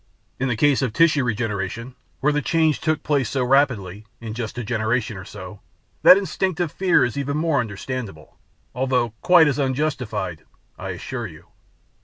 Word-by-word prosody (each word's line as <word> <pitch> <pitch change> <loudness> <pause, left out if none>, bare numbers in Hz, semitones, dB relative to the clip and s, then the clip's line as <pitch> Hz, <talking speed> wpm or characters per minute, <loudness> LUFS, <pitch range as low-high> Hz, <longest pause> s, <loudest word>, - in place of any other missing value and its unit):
In 135 - 0
the 120 - 0
case 140 +4 +3
of 125 -5 -1
tissue 155 -1 +4
regeneration, 115 0 -3 0.3
where 150 +2 +2
the 150 - +1
change 160 -1 +1
took 155 -1 0
place 140 -6 +1
so 135 -2 0
rapidly, 115 -7 +1
in 115 -2 -6
just 115 +1 -5
a 120 - -3
generation 115 0 -1
or 95 -1 -8
so, 100 0 -10 0.4
that 185 - +9
instinctive 185 -4 -1
fear 185 -2 +3
is 125 +3 -3
even 140 +1 -2
more 155 -2 +1
understandable 110 -5 -6 0.3
although 125 -2 0
quite 175 -3 +6
as 145 0 0
unjustified, 125 - -2 0.3
I - - -7
assure - - -5
you." - - -15
125 Hz, 165 wpm, -22 LUFS, 110-145 Hz, 0.4 s, that